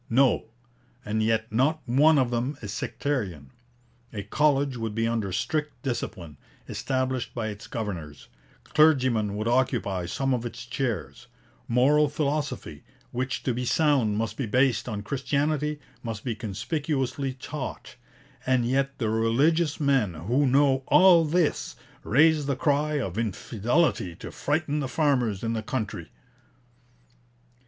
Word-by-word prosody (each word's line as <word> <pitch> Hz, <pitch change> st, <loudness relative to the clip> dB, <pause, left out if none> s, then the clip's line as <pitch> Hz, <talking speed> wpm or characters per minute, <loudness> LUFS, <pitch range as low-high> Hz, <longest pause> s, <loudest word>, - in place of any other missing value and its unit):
No; 130 Hz, 0 st, +3 dB, 0.6 s
and 110 Hz, +1 st, -1 dB
yet 110 Hz, 0 st, 0 dB
not 140 Hz, +7 st, +2 dB
one 145 Hz, +6 st, +5 dB
of 130 Hz, -3 st, +2 dB
them 125 Hz, +4 st, -1 dB
is 100 Hz, -1 st, -5 dB
sectarian. 95 Hz, -, -3 dB, 0.6 s
A 100 Hz, -2 st, -5 dB
college 145 Hz, -1 st, +1 dB
would 115 Hz, -3 st, -4 dB
be 115 Hz, 0 st, +1 dB
under 115 Hz, -4 st, -1 dB
strict 150 Hz, -, -2 dB
discipline, 95 Hz, -, -4 dB, 0.3 s
established 130 Hz, -2 st, -2 dB
by 110 Hz, -2 st, -2 dB
its 105 Hz, +1 st, -8 dB
governors; 85 Hz, -10 st, -6 dB, 0.4 s
clergymen 130 Hz, -9 st, +3 dB
would 110 Hz, +2 st, -2 dB
occupy 120 Hz, -7 st, 0 dB
some 135 Hz, +8 st, 0 dB
of 120 Hz, -2 st, -1 dB
its 120 Hz, 0 st, -7 dB
chairs; 115 Hz, -, -3 dB, 0.4 s
moral 140 Hz, +5 st, +4 dB
philosophy, 145 Hz, -, -3 dB, 0.3 s
which 130 Hz, +2 st, -3 dB
to 125 Hz, -, 0 dB
be 125 Hz, +2 st, -3 dB
sound 130 Hz, -6 st, +2 dB
must 110 Hz, -1 st, -2 dB
be 130 Hz, -, -2 dB
based 125 Hz, +2 st, +2 dB
on 105 Hz, -2 st, -4 dB
Christianity, 145 Hz, +4 st, -1 dB, 0.2 s
must 115 Hz, -3 st, -5 dB
be 120 Hz, -, -2 dB
conspicuously 130 Hz, -, -2 dB
taught; 135 Hz, -1 st, -7 dB, 0.5 s
and 130 Hz, -2 st, +2 dB
yet 135 Hz, +2 st, 0 dB
the 110 Hz, -3 st, -1 dB
religious 145 Hz, +9 st, +2 dB
men 135 Hz, -, +2 dB
who 120 Hz, -, +1 dB
know 135 Hz, 0 st, +3 dB
all 180 Hz, -3 st, +6 dB
this 160 Hz, 0 st, 0 dB, 0.3 s
raise 150 Hz, +4 st, +4 dB
the 140 Hz, -, +1 dB
cry 150 Hz, +2 st, +1 dB
of 100 Hz, -5 st, -3 dB
infidelity 115 Hz, -, 0 dB
to -, -, -9 dB
frighten 150 Hz, 0 st, -1 dB
the 135 Hz, -, -2 dB
farmers 125 Hz, -9 st, +1 dB
in 115 Hz, 0 st, -1 dB
the 110 Hz, -, -2 dB
country.' 110 Hz, -1 st, -4 dB
130 Hz, 135 wpm, -26 LUFS, 110-145 Hz, 0.6 s, all